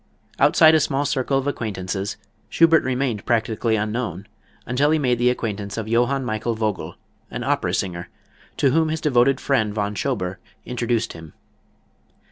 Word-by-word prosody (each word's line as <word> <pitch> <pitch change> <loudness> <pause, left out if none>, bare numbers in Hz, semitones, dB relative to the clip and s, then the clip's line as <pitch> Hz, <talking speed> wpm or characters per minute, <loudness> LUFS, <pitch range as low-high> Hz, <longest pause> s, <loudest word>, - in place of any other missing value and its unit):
Outside 160 0 +6
a 160 - +5
small 145 -1 0
circle 135 0 0
of 135 - -1
acquaintances, 100 -7 -3 0.3
Schubert 165 -1 +4
remained 125 -5 -1
practically 115 -1 0
unknown 105 -3 -3 0.4
until 135 +5 +1
he 160 - +3
made 125 -5 +1
the 125 +1 +4
acquaintance 105 -5 -3
of 110 -1 -3
Johann 125 +4 +1
Michael 110 0 -2
Vogl, 110 -3 -3 0.3
an - - -5
opera - - 0
singer, 85 -2 -3 0.5
to 135 - +3
whom 160 +2 +2
his 160 0 -2
devoted 135 -2 +3
friend, 110 -7 0
Von 105 -1 -1
Schober, 95 -6 -2 0.3
introduced 120 -2 -1
him. 80 -2 -12
120 Hz, 150 wpm, -22 LUFS, 105-135 Hz, 0.5 s, Outside